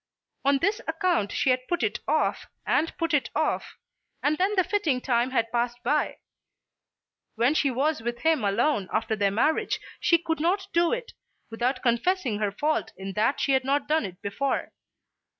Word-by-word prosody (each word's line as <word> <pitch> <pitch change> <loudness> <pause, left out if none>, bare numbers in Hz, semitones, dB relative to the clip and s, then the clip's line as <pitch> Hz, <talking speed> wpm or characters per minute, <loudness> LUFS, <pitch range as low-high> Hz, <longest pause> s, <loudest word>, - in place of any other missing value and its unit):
On 280 0 +4
this 400 +9 0
account 350 - 0
she 265 - +2
had 255 0 -1
put 350 - -1
it - - 0
off, - - 0 0.2
and 325 - +1
put 330 -1 -1
it 270 -5 +2
off, 310 +1 -1 0.5
and 295 +1 +3
then 390 +3 +2
the 370 - +4
fitting 335 -11 0
time 245 -1 +1
had 230 -3 0
passed 240 0 0
by. 295 +5 0 1.2
When 240 +5 +3
she 290 -2 +2
was 275 +2 0
with 240 +1 -4
him 320 -6 +2
alone 205 - +1
after 220 0 0
their 200 -1 +2
marriage 245 +11 +1 0.2
she 340 - +4
could 325 -1 -3
not 370 +5 +1
do 340 0 +3
it, - - -3 0.4
without 250 +3 -1
confessing 245 - +1
her 210 -2 0
fault 300 +9 -1
in 195 0 -6
that 220 +7 +1
she 275 - +1
had 265 -1 +3
not 280 +2 0
done 310 +1 +2
it 180 0 -12
before. 265 +7 -2
270 Hz, 180 wpm, -26 LUFS, 235-320 Hz, 1.2 s, On